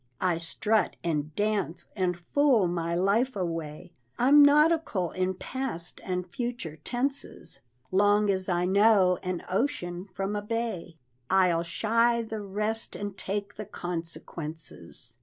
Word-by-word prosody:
I 180 -3 +1
strut 210 +6 +1
and 155 -3 -2
dance, 205 -5 -1
and 180 -3 0 0.2
fool 270 -10 +4
my 170 -1 -1
life 210 +8 +2
away; 165 -4 -4 0.3
I'm 280 +4 +6
nautical 295 - +4
in 185 0 -1
past 180 -7 -4
and 180 -1 -2
future 235 -5 -4
tenses! 255 - -3 0.3
Long 205 +2 +4
as 190 -1 -2
I 175 0 +1
know 195 -1 +4
an 185 -1 -3
ocean 190 -5 -2
from 195 +2 -3
a 205 - -1
bay, 220 -6 -3 0.3
I'll 180 -3 +4
shy 230 +6 +2
the 220 -1 -5
rest, 210 +3 -3
and 205 -1 -5
take 200 +1 -3
the 215 - -5
consequences. 165 - -6
190 Hz, 130 wpm, -28 LUFS, 175-225 Hz, 0.3 s, I'm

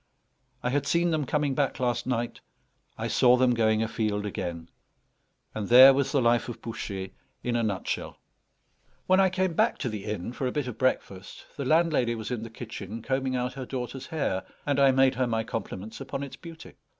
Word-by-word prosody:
I 125 - 0
had 140 +1 0
seen 170 0 +2
them 155 -4 0
coming 145 -1 0
back 140 0 0
last 120 -1 -1
night, 120 -2 -2 0.6
I - - -2
saw 125 0 +5
them 125 -1 +3
going 110 -1 +2
afield 110 -2 -1
again; 85 -4 -4 0.9
and 105 -2 -4
there 130 +3 +10
was 135 0 0
the 140 -4 +2
life 120 +1 +2
of 120 - -7
Bouchet 95 -4 -6 0.3
in 120 -1 -1
a 120 - +2
nutshell. 100 -5 -3 0.9
When 185 +1 +4
I 190 -1 +5
came 185 -1 0
back 220 +7 +2
to 130 - -2
the 105 -3 -6
inn 105 +2 -4
for 130 - -2
a - - -1
bit 145 -1 -2
of 125 -3 -7
breakfast, 100 -7 -2
the 140 - -4
landlady 155 -6 +2
was 110 +1 -6
in 120 -3 -2
the 115 - -7
kitchen 110 -2 -7
combing 130 -1 -1
out 125 0 -1
her 135 -2 -6
daughter's 130 0 -5
hair; 140 - -1 0.2
and 140 -1 +1
I 140 -1 +6
made 130 0 +4
her 130 0 0
my 115 -1 0
compliments 110 0 -6
upon 135 +1 -4
its 140 - -7
beauty. 165 -2 -11
125 Hz, 200 wpm, -27 LUFS, 110-140 Hz, 0.9 s, there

